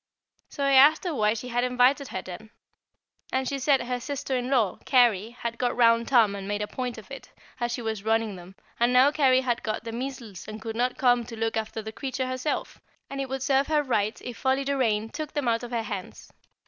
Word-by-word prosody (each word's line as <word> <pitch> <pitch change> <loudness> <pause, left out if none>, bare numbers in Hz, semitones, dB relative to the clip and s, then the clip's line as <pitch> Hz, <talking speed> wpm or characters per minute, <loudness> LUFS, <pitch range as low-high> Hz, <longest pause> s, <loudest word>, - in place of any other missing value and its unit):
So 280 - -4
I 275 - +3
asked 280 +4 +6
her 355 -3 -2
why 215 -4 +2
she 250 +3 -6
had 245 0 0
invited 250 +3 +3
her, 190 - -5
then. 190 +4 -9 0.8
And 260 0 0
she 275 +1 -2
said 270 -1 +3
her 250 +1 -3
sister 265 +1 -3
in 250 0 -2
law, 230 -9 +1
Carry, 240 -6 +3
had 235 -1 -6
got 245 -1 0
round 230 -1 +4
Tom 230 -6 +4
and 195 -1 -6
made 205 +1 -1
a - - -4
point 250 -1 -4
of 220 +5 -12
it, 265 -2 -9 0.3
as 240 -1 -1
she 240 0 -4
was 220 -3 -3
running 220 -1 0
them, 180 +1 -12 0.2
and 240 +1 +3
now 260 +3 +6
Carry 265 -4 +4
had 245 -2 -1
got 215 0 -3
the 230 - -5
measles 240 -5 -6
and 215 0 -7
could 225 0 -6
not 245 +2 0
come 245 -2 +3
to 230 0 -9
look 225 0 -1
after 220 0 -3
the 220 - -6
creature 260 +2 -3
herself; 255 +3 -3 0.3
and 275 0 -3
it 270 - -4
would 265 -1 -3
serve 275 0 +2
her 305 -1 +2
right 215 -5 0
if 245 -2 -7
Folly 265 +1 +1
Doraine 230 -6 +1
took 305 0 -6
them 290 -4 -1
out 230 -1 +2
of 245 - -7
her 235 -2 -2
hands. 200 -3 -7
245 Hz, 235 wpm, -26 LUFS, 220-265 Hz, 0.8 s, asked